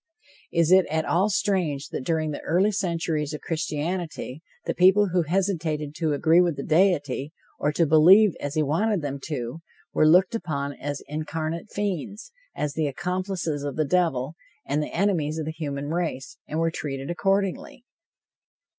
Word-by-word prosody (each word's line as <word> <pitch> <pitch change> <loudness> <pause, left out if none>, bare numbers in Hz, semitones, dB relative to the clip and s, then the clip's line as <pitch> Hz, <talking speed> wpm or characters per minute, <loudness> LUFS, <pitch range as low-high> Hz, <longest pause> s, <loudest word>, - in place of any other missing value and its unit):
Is 170 0 +2
it 190 0 +6
at 160 +1 -1
all 190 +5 +2
strange 180 -9 0
that - - -4
during 155 +1 0
the 145 - -5
early 190 +5 +2
centuries 165 -6 -1
of - - -8
Christianity, 160 -2 -3 0.2
the - - -1
people 190 +3 +5
who 180 0 +2
hesitated 160 -4 -1
to 160 -3 0
agree 160 +4 +4
with 175 -3 +1
the 140 - -5
deity, 155 -5 +1 0.3
or 150 - +1
to 165 - +3
believe 175 +7 +7
as 145 +1 -4
he 155 - +2
wanted 175 +5 0
them 140 -1 -3
to, 140 0 -4 0.3
were 155 - +4
looked 180 +6 +5
upon 145 -10 -3
as 145 +1 -5
incarnate 155 +4 -4
fiends, 205 - -4 0.2
as 150 -1 -2
the 155 0 0
accomplices 180 0 -2
of 145 -1 -4
the 155 - +1
devil 150 -4 +1 0.3
and 145 +2 0
the 150 - -4
enemies 165 -5 0
of 160 - -3
the 160 - -3
human 145 -3 -4
race, 165 -6 -3
and 155 - -4
were 165 0 +1
treated 135 -1 -4
accordingly? 195 +5 -1
160 Hz, 165 wpm, -25 LUFS, 150-180 Hz, 0.3 s, believe